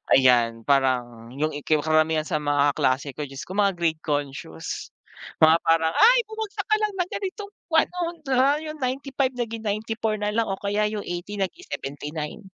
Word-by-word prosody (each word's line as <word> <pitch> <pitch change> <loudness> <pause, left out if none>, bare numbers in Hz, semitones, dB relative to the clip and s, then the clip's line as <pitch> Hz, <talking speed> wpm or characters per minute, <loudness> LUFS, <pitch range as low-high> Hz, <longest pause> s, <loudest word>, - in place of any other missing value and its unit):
Ayan, 120 -3 +4
parang 125 -4 +1
yung 155 +3 0
ika 150 +1 +1
karamihan 155 0 +2
sa 155 - -1
mga 145 -1 +2
kaklase 135 +2 0
ko, 150 - -4
Diyos 135 +1 -8
ko 185 - -8
mga 200 -2 +3
grade 160 -2 0
conscious 140 - -4 0.5
mga 160 +1 +8
parang, 165 0 +3
"ay 485 +3 +7
bumagsak 435 -3 -5
ka 430 - +4
lang 425 - +1
ng 360 - 0
ganitong 400 +1 -5 0.2
kwan 320 - +4
'no 360 - -5 0.3
na 270 +2 +3
yung 310 -1 -6
95 270 +1 -1
naging 230 -2 -3
94 215 +1 -1
na 210 0 -1
lang 230 - +3
o 195 - -2
kaya 205 +1 0
yung 210 -2 -4
80 175 +4 -5
naging 195 - -3
79," 150 +2 -5
175 Hz, 175 wpm, -24 LUFS, -, 0.5 s, mga